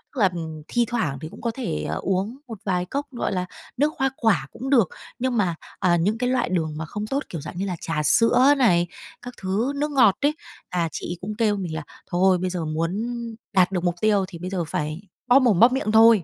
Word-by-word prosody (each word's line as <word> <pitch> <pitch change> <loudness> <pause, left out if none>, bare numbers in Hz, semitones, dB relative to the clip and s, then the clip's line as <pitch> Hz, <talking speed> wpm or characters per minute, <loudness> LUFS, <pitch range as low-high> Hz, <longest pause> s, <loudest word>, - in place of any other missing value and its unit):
Tức - - -3
là, 195 - +6
ừm, 160 -2 -6
thi 240 -1 +1
thoảng 185 - -1
thì 155 - -6
cũng - - -12
có 235 - -1
thể, 150 - -3
à, 80 - -1
uống 195 - -1
một 225 -3 -7
vài 180 -2 0
cốc, 280 +10 -3
gọi 240 - -2
là, 180 -2 -1 0.3
nước 295 +4 +2
hoa 270 0 +2
quả 190 - +2
cũng 265 - -6
được. 235 - +4 0.3
Nhưng 255 -1 0
mà, 180 -5 +1 0.2
à, 175 -1 +3
những 200 +7 +1
cái 250 0 0
loại 255 -7 +1
đường 160 -4 -1
mà 160 - -4
không 210 +6 -5
tốt, 275 +5 -1
kiểu 165 - -5
dạng 155 +3 -8
như 190 - -1
là, 185 -2 -2
trà 150 -2 -1
sữa 245 - +5
này, 175 -10 +4 0.3
các 245 0 -8
thứ 210 +8 0
nước 295 +1 -1
ngọt 235 -9 +5
đấy, 290 +2 +2 0.3
à, 170 -2 0
chị - - -5
ấy 175 - -4
cũng 210 +3 -4
kêu 220 -3 +2
mình 180 -5 -4
là 160 - -4 0.3
"Thôi 185 +1 +4
bây 180 +1 -2
giờ 175 -3 -3
muốn 165 +4 -1 0.6
đạt 185 -1 +4
được 180 -2 -1
mục 175 -1 +1
tiêu 205 -3 +3
thì 170 - -10
bây 180 +2 -5
giờ 185 -3 -1
phải 155 +3 -3 0.3
bóp 250 +2 +7
mồm 235 -9 +3
bóp 240 +2 +7
miệng 255 -5 0
thôi." 220 -3 +7
195 Hz, 250 wpm, -24 LUFS, 175-240 Hz, 0.6 s, bóp